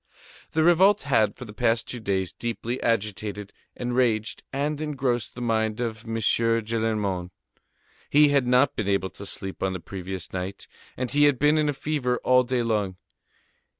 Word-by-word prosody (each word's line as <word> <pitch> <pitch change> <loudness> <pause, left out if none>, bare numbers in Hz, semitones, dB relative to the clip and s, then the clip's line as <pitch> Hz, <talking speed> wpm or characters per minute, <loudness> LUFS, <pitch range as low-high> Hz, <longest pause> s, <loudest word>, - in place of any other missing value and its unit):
The 160 - +3
revolt 190 +5 +5
had, 110 -7 +2
for 125 - -9
the 105 - -10
past 115 0 +1
two 125 - -5
days, 95 -4 -1
deeply 120 +4 -4
agitated, 105 -2 -2 0.2
enraged 120 -3 0
and 145 +2 -2
engrossed 130 -6 -1
the 125 - -5
mind 110 -1 0
of 115 -2 -3
M. 115 0 -4
Gillenormand. 110 -4 0 0.8
He 150 0 +6
had 140 -3 +2
not 125 +3 +4
been 105 -2 -2
able 100 -1 0
to 100 - -10
sleep 95 -1 -6
on 95 -1 0
the 95 - -4
previous 95 0 -7
night, 95 +1 -5 0.3
and 125 -1 -3
he 145 +1 +4
had 145 -3 +4
been 150 +3 +3
in 150 -1 +2
a - - 0
fever 135 -3 -1
all 125 0 +5
day 125 -1 -1
long. 105 -5 0
115 Hz, 170 wpm, -25 LUFS, 105-130 Hz, 0.8 s, He